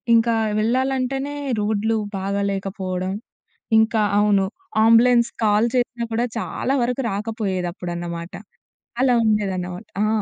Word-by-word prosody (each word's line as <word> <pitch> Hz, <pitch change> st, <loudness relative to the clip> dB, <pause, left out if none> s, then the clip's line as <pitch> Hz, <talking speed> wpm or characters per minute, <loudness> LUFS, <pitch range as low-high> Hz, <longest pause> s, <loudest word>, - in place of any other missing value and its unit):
ఇంకా 230 Hz, 0 st, +3 dB, 0.2 s
వెళ్ళాలంటేనే 265 Hz, +4 st, 0 dB, 0.2 s
రోడ్లు 220 Hz, +1 st, 0 dB, 0.2 s
బాగాలేకపోవడం. 195 Hz, -1 st, -2 dB, 0.7 s
ఇంకా 220 Hz, 0 st, +3 dB, 0.2 s
అవును. 205 Hz, -2 st, +3 dB, 0.4 s
ఆంబులెన్స్‌కు 235 Hz, +1 st, +4 dB
కాల్ 210 Hz, +2 st, +3 dB
చేసినా 240 Hz, -1 st, -1 dB
కూడా, 235 Hz, +2 st, +1 dB
చాలా 265 Hz, +4 st, -2 dB
వరకు 250 Hz, +2 st, -1 dB
రాకపోయేదప్పుడన్నమాట. 180 Hz, -5 st, -4 dB, 0.7 s
అలా 255 Hz, -2 st, +4 dB
ఉండేదన్నమాట. 190 Hz, -2 st, -1 dB, 0.2 s
ఆ! -, -, +1 dB
215 Hz, 95 wpm, -22 LUFS, 190-235 Hz, 0.7 s, ఆంబులెన్స్‌కు